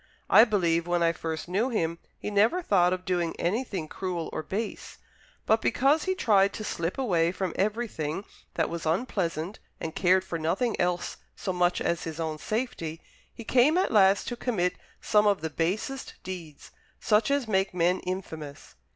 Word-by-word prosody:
I 220 +4 +9
believe, 170 -6 +1
when 175 -1 +1
I 165 - +4
first 160 -1 -5
knew 205 +8 0
him, 170 -8 -1 0.2
he 210 - -5
never 220 - +3
thought 180 - +3
of 185 0 -3
doing 175 -2 0
anything 190 -3 -1
cruel 175 -1 -4
or - - -2
base. 205 +8 -5 0.5
But 220 +1 +3
because 285 +4 +2
he 375 0 0
tried 200 - +3
to 215 - -5
slip 170 -4 -3
away 175 -10 +2
from 185 -2 -3
everything 200 -5 -2 0.3
that 160 - +1
was 170 -1 -4
unpleasant, 175 -1 -1 0.2
and 160 - -4
cared 185 +1 +3
for 170 -2 -4
nothing 190 +9 0
else 175 0 -1 0.2
so 185 - -3
much 180 0 +2
as 170 - -1
his 160 -1 -6
own 160 -2 -3
safety, 215 -9 -3 0.3
he 230 - -10
came 260 +8 +4
at 370 - +1
last 195 -2 +4
to 240 - -3
commit 205 -8 0 0.3
some 210 -1 +3
of 200 -4 +2
the 160 0 -3
basest 200 - -2
deeds 175 -5 -8 0.3
such 210 +2 +2
as 280 -4 +1
make 195 -2 +1
men 180 +1 +2
infamous. 160 -6 -6
185 Hz, 175 wpm, -27 LUFS, 170-215 Hz, 0.5 s, I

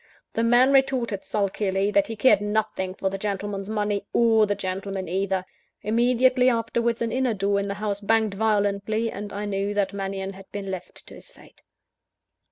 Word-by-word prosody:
The 230 - 0
man 245 +4 +5
retorted 255 -7 +1
sulkily, 200 -1 0
that 200 -1 +3
he 225 - -5
cared 210 -2 +4
nothing 205 -3 -1
for 190 -1 -2
the 195 - -4
gentleman's 200 0 -3
money, 210 -2 -1
or 225 -2 +4
the 205 - 0
gentleman 190 0 -4
either. 190 +1 -1 0.4
Immediately 250 +3 +3
afterwards 235 0 0
an 230 - -2
inner 255 -3 0
door 200 0 +1
in 200 - -2
the 200 - -3
house 205 -1 -2
banged 220 0 +2
violently; 210 +1 0
and 205 0 -7
I 205 +1 -4
knew 200 0 -2
that 200 -1 0
Mannion 195 0 -4
had 190 0 -14
been 195 -1 -5
left 185 -1 -7
to - - -13
his - - -11
fate. - - -19
205 Hz, 175 wpm, -25 LUFS, 195-225 Hz, 0.4 s, man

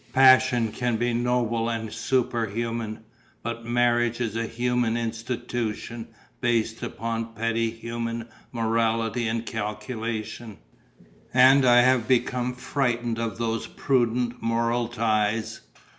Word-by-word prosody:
Passion 130 -3 +5
can 120 0 -1
be 120 +1 0
noble 120 -1 0
and 115 -2 -3
superhuman, 115 -3 -1 0.4
but 115 0 -5
marriage 120 0 +2
is 115 -3 -2
a 115 0 -1
human 120 0 0
institution 115 0 -4 0.3
based 115 -2 0
upon 115 +1 -3
our 115 - -15
petty 115 +1 0
human 115 0 -5 0.2
morality 115 0 0
and 115 +1 -2
calculation. 110 0 -4 0.8
And 130 +1 +7
I 120 0 +7
have 125 -2 +3
become 125 0 +1
frightened 120 -3 -1
of 115 -1 -3
those 115 -1 -2
prudent 120 -2 0
moral 115 +1 0
ties. 110 -1 0
115 Hz, 115 wpm, -25 LUFS, 115-120 Hz, 0.8 s, And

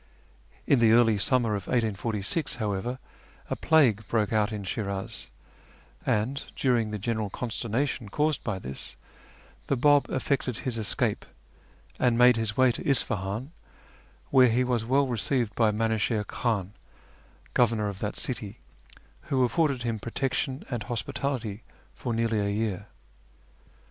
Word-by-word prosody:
In 140 - +4
the 115 -1 +5
early 115 -3 +5
summer 125 +1 +2
of 100 - -4
1846, 110 - -1
however, 110 +2 -2 0.5
a - - +1
plague 130 -10 +3
broke 110 -2 0
out 110 0 +2
in 105 -2 -4
Shi'nlz, 100 +1 -4 0.8
and, 125 +7 0
during 120 -5 +1
the 105 - -3
general 110 0 -2
consternation 120 +1 -2
caused 150 +6 0
by 110 -5 -2
this, 70 -7 -7 0.7
the 140 - +1
]3;Lb 145 +2 +4
effected 130 -2 -1
his 120 -4 -3
escape, 105 - 0 0.8
and 120 -2 +3
made 125 0 +7
his 110 -2 -2
way 130 -1 +5
to - - -4
Isfahan, 110 -1 0 0.8
where 130 -2 +7
he 120 +3 +2
was 120 -3 0
well 135 +4 +3
received 120 -2 -1
by 110 0 +3
Minuchihr 110 0 0
Khan, 105 -4 -2 0.8
governor 115 -3 +2
of 100 -2 -5
that 105 0 -3
city, 115 -4 -5 0.7
who 130 -2 +3
afforded 140 -1 +1
him 115 -2 -2
protection 130 +4 -2
and 120 -3 -2
hospitality 115 0 -3 0.3
for 125 - -4
nearly 115 -1 +1
a 100 0 0
year. 100 -1 -2
115 Hz, 135 wpm, -27 LUFS, 105-125 Hz, 0.8 s, made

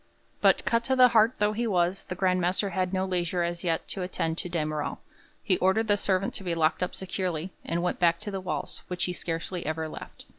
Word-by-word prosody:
But - - +4
cut 230 0 +2
to 265 - +2
the 255 -1 +7
heart 225 +1 +5
though 210 0 +2
he 235 +2 -1
was, 180 -2 +1
the 180 - -5
Grand 185 0 +2
Master 185 +3 0
had 185 0 0
no 190 0 0
leisure 180 -1 0
as 170 0 -2
yet 165 -2 0
to 195 - -4
attend 165 -2 -2
to 180 - -4
de 165 -3 0
Merall; 155 -1 -3 0.5
he 185 - +2
ordered 190 +5 +2
the 205 - +4
servant 195 -1 0
to - - -6
be 175 -2 -1
locked 160 +1 +2
up 180 - -1
securely, 185 -2 -3
and 170 +1 -2
went 180 - -1
back 170 -1 +3
to 210 -1 -5
the 195 -1 -3
walls, 185 - -4
which 180 -1 -3
he 180 - 0
scarcely 170 +1 -3
ever 160 +1 -2
left. - - -10
180 Hz, 235 wpm, -28 LUFS, 170-195 Hz, 0.5 s, the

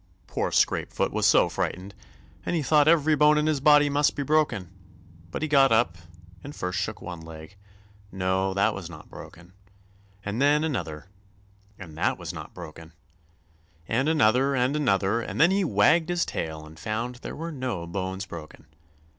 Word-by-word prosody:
Poor - - -2
Scrapefoot - - +1
was - - +2
so - - +5
frightened, 95 +3 -4 0.5
and - - -2
he 160 - 0
thought 150 +1 +4
every 160 -1 +4
bone 150 +1 +5
in 150 - +1
his 155 -2 +1
body 145 +1 +5
must 145 0 +1
be 145 - -2
broken. 140 - 0 0.6
But 115 - -5
he - - 0
got 135 -3 +4
up 110 -6 +2 0.5
and 145 +1 -9
first 90 0 -3
shook 110 +3 -4
one 85 -1 -7
leg—no, 95 +3 -5
that 100 +2 +2
was 90 -3 -7
not 75 -3 -13
broken; 90 +2 -12 0.7
and 100 +5 -3
then 145 +2 +4
another, 85 - -4 0.7
and 85 -5 -11
that - - +1
was - - -6
not - - -8
broken; 80 +1 -11 0.9
and 130 +6 +1
another 135 -2 +3
and 130 +3 +1
another, 115 -6 +1
and - - -6
then 170 +4 +6
he 195 +1 +2
wagged 160 - +3
his 175 0 +1
tail 80 -1 -5
and 80 +1 -14
found 115 +7 -3
there - - -8
were 165 +2 -5
no 125 - -4
bones 95 +2 -4
broken. 85 -5 -10
110 Hz, 170 wpm, -26 LUFS, 95-145 Hz, 0.9 s, then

